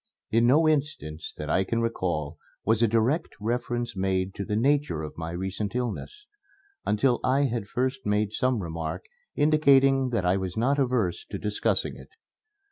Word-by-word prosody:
In 115 +2 +4
no 155 +6 +5
instance 140 - -1
that 75 - -5
I 95 +6 +2
can 115 +4 -1
recall 85 -9 -2 0.3
was 110 +1 +3
a 115 - +5
direct 115 +9 +1
reference 120 +1 -2
made 95 0 0
to 100 - -4
the 105 +1 -2
nature 135 - +1
of 75 - -7
my 80 0 -5
recent 95 +5 -4
illness, 125 - -4 0.6
until 120 +4 +2
I 130 +2 +3
had 120 -6 -1
first 130 +3 -2
made 105 0 0
some 125 -4 0
remark 80 -1 -4 0.3
indicating 135 -3 +4
that 115 -7 -1
I 90 +2 +3
was 95 0 -4
not 135 +5 +2
averse 125 -9 0
to - - -6
discussing 105 0 -1
it. - - -13
115 Hz, 165 wpm, -27 LUFS, 95-130 Hz, 0.6 s, no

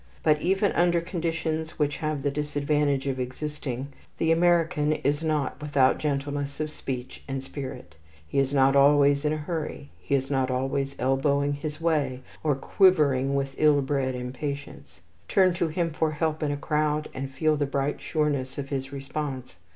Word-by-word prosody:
But 150 -1 +3
even 195 +2 +2
under 175 0 +3
conditions 165 -2 -3
which 145 -1 0
have 155 -3 -2
the 145 - +1
disadvantage 145 -1 0
of 135 -2 -2
existing, 135 0 -4 0.3
the 165 - +2
American 165 -3 +3
is 145 0 0
not 150 -3 -1
without 140 -3 +3
gentleness 145 -1 -2
of 155 0 -2
speech 130 -3 -6
and 135 -1 -3
spirit. 135 -2 -7 0.3
He 140 - 0
is 135 0 +1
not 135 -1 +4
always 140 +1 +5
in 150 - +2
a 155 - 0
hurry. 150 -2 -5
He 140 - 0
is 135 +1 -1
not 135 -1 +1
always 135 +2 -1
elbowing 140 +2 +1
his 150 +1 -5
way, 145 -6 0 0.2
or 150 -3 +2
quivering 140 -4 +3
with 135 -1 -1
ill 150 -2 +5
bred 135 -2 -1
impatience. 140 +3 -6 0.3
Turn 185 -2 +4
to 170 -1 0
him 165 +1 -1
for 160 0 +1
help 155 +1 -1
in 150 - 0
a 145 - -1
crowd, 150 0 0
and 135 +1 -4
feel 155 +3 +1
the 145 -1 0
bright 140 +1 -1
sureness 145 -4 -1
of 140 -1 -4
his 135 -1 -3
response. 135 - -5
145 Hz, 170 wpm, -26 LUFS, 135-155 Hz, 0.3 s, always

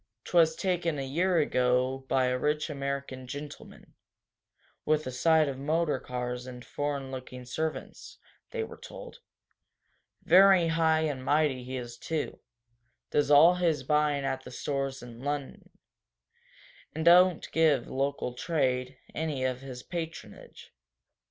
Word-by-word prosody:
"'Twas 165 -2 +3
taken 175 -4 -1
a 135 - -3
year 175 +7 +1
ago 130 -3 +1
by 130 -1 +3
a 125 0 +1
rich 150 +4 -1
American 140 -2 -4
gentleman, 145 +3 -9 0.9
with 155 0 +1
a 130 - -4
sight 155 +4 +3
of 135 -1 -4
motor 150 0 0
cars 125 0 -5
and 125 -1 -9
foreign 140 -2 -3
looking 130 -1 -8
servants," 155 +6 -5 0.3
they 465 -2 -3
were - - -9
told. - - -10 1.0
"Very 185 -2 +6
high 160 -1 +2
and 145 -5 -2
mighty 145 -2 +1
he 130 +1 -5
is, 120 -1 -7
too 160 -2 -3 0.7
does 145 -1 +2
all 150 +4 +8
his 175 -4 0
buying 150 -2 +1
at 130 -1 -2
the - - -10
stores 135 -2 -3
in 120 -1 -11
Lunnon, 145 +1 -5 1.3
and 160 - -3
don't 180 0 +6
give 155 -6 +3
local 135 -2 -2
trade 130 -3 -1 0.2
any 150 -4 -2
of 130 0 -1
his 130 -2 -8
patronage." 165 - -8
145 Hz, 135 wpm, -29 LUFS, 130-160 Hz, 1.3 s, all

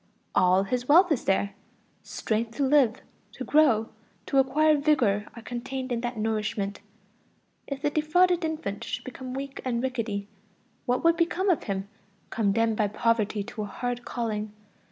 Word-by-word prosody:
All 185 +1 +4
his 245 +5 -2
wealth 350 +4 +6
is 285 - 0
there: 200 +1 +1 0.5
strength 225 +1 -3
to 285 - +1
live, 265 -5 +3 0.3
to - - -6
grow, 255 -8 +3 0.4
to 275 - +2
acquire 305 +4 +4
vigor 255 -9 +2
are 235 - -10
contained 255 +2 -5
in 235 -1 -1
that 240 -1 -3
nourishment. 215 -2 -2 0.9
If 280 +1 -5
the 295 - +1
defrauded 350 +4 +3
infant 305 -10 -3
should - - -4
become 255 0 -7
weak 275 0 -5
and 245 -1 -1
rickety, 225 -6 -2 0.6
what 250 +1 +1
would 335 0 +4
become 360 +3 +2
of 340 - -1
him, 195 -1 -3 0.4
condemned 225 +1 +1
by 210 - +2
poverty 215 -1 0
to 215 - -7
a - - -2
hard 245 +4 -4
calling? 215 -4 -3
240 Hz, 155 wpm, -27 LUFS, 215-285 Hz, 0.9 s, wealth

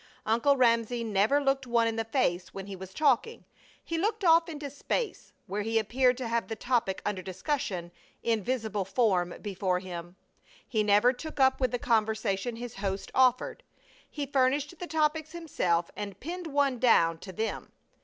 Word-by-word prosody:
Uncle 235 +6 +3
Ramsay 235 -1 +2
never 215 +5 +2
looked 270 -2 0
one 235 -1 +3
in 225 - -1
the 225 - -1
face 215 -7 -1
when 195 -1 -5
he 200 -1 -7
was 190 0 -9
talking. 295 - +1 0.4
He 330 -1 -3
looked 425 +3 -1
off 330 0 +5
into 295 -3 -6
space, 430 - -3
where 205 +2 -3
he 225 +2 0
appeared 250 +3 +2
to 255 -2 -4
have 230 0 -1
the 225 - -4
topic 230 -6 -1
under 205 -3 -1
discussion 185 - -3 0.3
in 225 -3 +1
visible 220 -4 -1
form 190 -4 +1
before 190 -3 -1
him. 175 -1 -7 0.5
He 220 -4 0
never 210 +4 +4
took 310 +3 -8
up 265 0 +4
with 255 - +3
the 245 - -1
conversation 220 -2 0
his 240 -1 -7
host 195 0 -3
offered. 255 -1 +2 0.5
He 290 -2 -4
furnished 280 +4 +1
the 355 - -5
topics 315 0 0
himself 180 - -1
and 200 -2 -6
pinned 350 +4 -5
one 280 -4 +1
down 165 -9 +4
to 190 - -9
them. 220 +4 -4
235 Hz, 175 wpm, -29 LUFS, 200-275 Hz, 0.5 s, off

